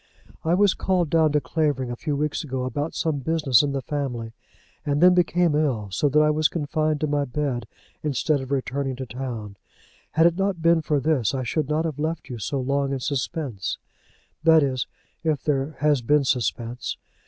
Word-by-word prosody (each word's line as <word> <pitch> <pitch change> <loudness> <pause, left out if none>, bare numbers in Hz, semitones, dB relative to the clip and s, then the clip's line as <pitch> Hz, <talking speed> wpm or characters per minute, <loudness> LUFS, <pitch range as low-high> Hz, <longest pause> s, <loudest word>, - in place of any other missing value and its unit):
I 165 +2 +2
was 200 0 +4
called 180 -5 0
down 160 -2 +4
to 150 - +4
Clavering 145 -5 -1
a - - -3
few 145 +4 -2
weeks 150 +2 -1
ago, 130 -3 -3
about 145 +5 -3
some 155 -3 0
business 145 -4 +3
in 145 - -1
the 135 -1 -3
family, 125 -6 -3 0.5
and 145 -1 0
then 180 +2 +7
became 175 -2 +2
ill, 130 -9 0
so 145 +10 +1
that 150 +3 +3
I 150 0 +4
was 155 +1 +3
confined 155 -1 -1
to - - +2
my 145 0 +1
bed 130 -4 -2 0.3
instead 150 0 0
of 130 - -7
returning 135 0 -1
to 130 +1 -5
town. 115 -4 -6 0.6
Had 165 +1 +4
it 170 0 +4
not 195 -2 0
been 165 0 +4
for 150 -1 +1
this 135 -4 +1
I 130 - -2
should 145 +4 -1
not 155 +2 +1
have 155 -3 -3
left 160 +1 -3
you 120 -2 -6
so 135 +7 -2
long 140 +1 0
in 135 - -1
suspense, 130 - -3 0.6
that 160 -2 +6
is 130 -3 -1 0.4
if 155 -4 0
there 140 0 -1
has 150 -3 +3
been 145 +4 +3
suspense. 120 -2 -2
145 Hz, 195 wpm, -24 LUFS, 130-155 Hz, 0.6 s, then